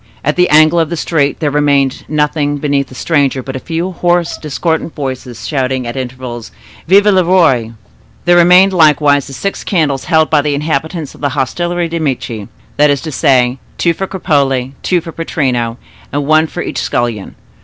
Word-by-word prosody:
At - - +1
the 180 0 +3
angle 155 +2 +5
of 160 -2 0
the 170 - -3
street 145 -3 0
there 150 -2 0
remained 140 -2 +1
nothing 150 -1 0
beneath 140 -1 -1
the 130 - -13
stranger 140 -3 0
but 135 +1 -6
a - - -3
few 165 +5 -3
hoarse, 175 -1 0
discordant 160 +2 -3
voices, 130 -4 -5
shouting 130 -3 -1
at 120 - -5
intervals 125 -2 -6 0.4
"Vive 200 +4 +5
le 190 -3 +4
Roi!" 150 -11 +2 0.5
There 175 0 +5
remained 180 +3 +6
likewise 150 -4 +3
the 135 - -9
six 195 +8 -4
candles 150 -8 0
held 160 -2 +2
by 150 -2 +4
the 145 0 -1
inhabitants 155 +1 -3
of - - -16
the 145 - 0
hostelry 175 +6 -1
des 165 0 -3
Medici; 125 -8 -3 0.3
that 150 0 +4
is 140 -2 +1
to 160 - -6
say, 130 -2 +2 0.2
two 170 - +2
for 195 +3 -4
Cropole, 135 -8 0
two 180 -2 +1
for 165 0 -8
Pittrino, 125 -8 -2 0.3
and 145 0 -2
one 155 +2 +3
for 175 - -5
each - - -4
scullion. 120 -5 -2
150 Hz, 185 wpm, -14 LUFS, 135-165 Hz, 0.5 s, remained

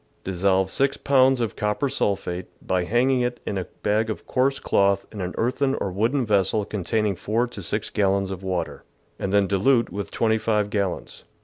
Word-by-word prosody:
— - - -39
Dissolve 95 0 +1
6 135 0 +1
pounds 135 -1 +4
of 115 -3 -2
copper 105 +7 0
sulphate, 95 -7 -2
by 90 -1 -1
hanging 125 +5 +2
it 120 0 -2
in - - -2
a 90 - -4 0.2
bag 110 +2 +1
of 110 - -5
coarse 135 +2 +1
cloth 100 0 +2
in 105 - -6
an 90 0 -4
earthen 135 +3 +1
or 95 - -2
wooden 115 +8 +1
vessel 105 0 +2
containing 105 0 -1
4 110 +7 0
to 120 -4 -8
6 105 +4 -3
gallons 100 -1 +1
of 95 -1 -5
water, 95 -2 -3 0.4
and 95 - -2
then 100 0 +4
dilute 115 +5 +2
with 100 +2 -4
25 110 -2 +1
gallons. 100 -4 -3
105 Hz, 185 wpm, -24 LUFS, 95-120 Hz, 0.4 s, pounds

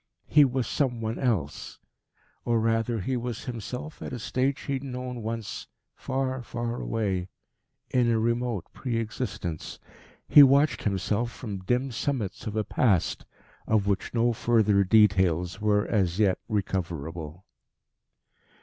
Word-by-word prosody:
He 150 -2 +6
was 130 -1 -1
some 125 -5 0
one 110 0 -3
else. 100 - -2 0.7
Or, 120 -1 +2
rather, 115 0 0
he 130 +7 -1
was 120 -2 -4
himself 125 +5 -6
at - - -5
a - - -3
stage 130 +4 -1
he 140 - -3
had 135 0 -2
known 125 -2 -5
once 110 -1 -5 0.3
far, 130 -1 -2
far 120 0 -4
away 95 -5 -1 0.6
in 125 -2 +3
a 115 - +3
remote 115 -3 0
pre 120 -4 -3
existence. 110 -8 -4 0.5
He 150 - +9
watched 140 +2 +5
himself 105 +4 0
from 105 -5 -6
dim 125 +7 0
summits 120 -4 -3
of 105 - -4
a 110 - +1
Past, 100 -6 +1 0.4
of 110 -2 +2
which 100 -1 -1
no 120 0 +2
further 110 -3 +3
details 95 -3 +3
were 105 -1 +2
as 95 -5 0
yet 100 -4 +3
recoverable. 85 -5 -3
115 Hz, 140 wpm, -27 LUFS, 100-125 Hz, 0.7 s, He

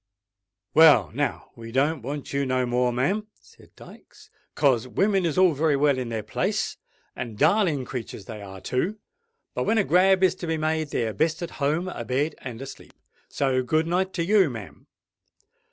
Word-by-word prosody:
"Well—now 145 - +4
we 115 0 -10
don't 140 +4 +1
want 140 +4 -6
you 140 0 +1
no 130 -1 0
more, 125 0 +1
ma'am," 185 - -1
said - - -21
Dykes; - - -16 0.2
"'cos 130 -4 +2
women 195 - +1
is 160 - -3
all 185 -3 +5
very 150 +1 +1
well 140 -2 +2
in 125 -2 -4
their 110 -2 -3
place; 105 - -2 0.4
and 115 -4 -6
darling 160 - +2
creatur's 115 -6 -7
they 110 0 -8
are 95 -1 -10
too. 175 +12 -2 0.6
But - - -2
when 225 - +2
a 210 - +4
grab 190 +1 +4
is 185 -1 +5
to 175 - -6
be 160 0 0
made, 155 0 -1
they're 115 -5 -1
best 160 +5 0
at 170 - -5
home, 155 +6 0
a 150 -10 -5
bed 135 +6 -1
and 120 -3 -8
asleep. 135 - -11 0.4
So 130 -2 0
good 155 +5 +1
night 185 +3 0
to 170 - -1
you, 195 -3 +4
ma'am." 110 -6 -10
145 Hz, 180 wpm, -25 LUFS, 125-170 Hz, 0.6 s, all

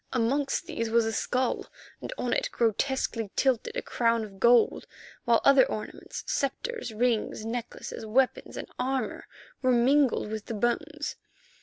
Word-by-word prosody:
Amongst 270 +3 +1
these 230 -1 -3
was 230 0 +3
a 225 - -1
skull, 255 +3 -1 0.3
and - - -6
on 245 - -1
it, - - 0
grotesquely 230 -1 0
tilted, 260 -4 +1
a - - -2
crown 230 -1 +1
of 195 -3 -10
gold, 235 +2 +4 0.4
while 235 -1 +4
other 275 -1 +7
ornaments—sceptres, 275 - -4
rings, 220 -1 0
necklaces, 235 0 -5
weapons 250 +4 0
and - - -5
armour—were 265 - -3
mingled 250 -2 +3
with 220 -1 -5
the 230 - -3
bones. 295 +7 -2
240 Hz, 135 wpm, -28 LUFS, 225-265 Hz, 0.4 s, other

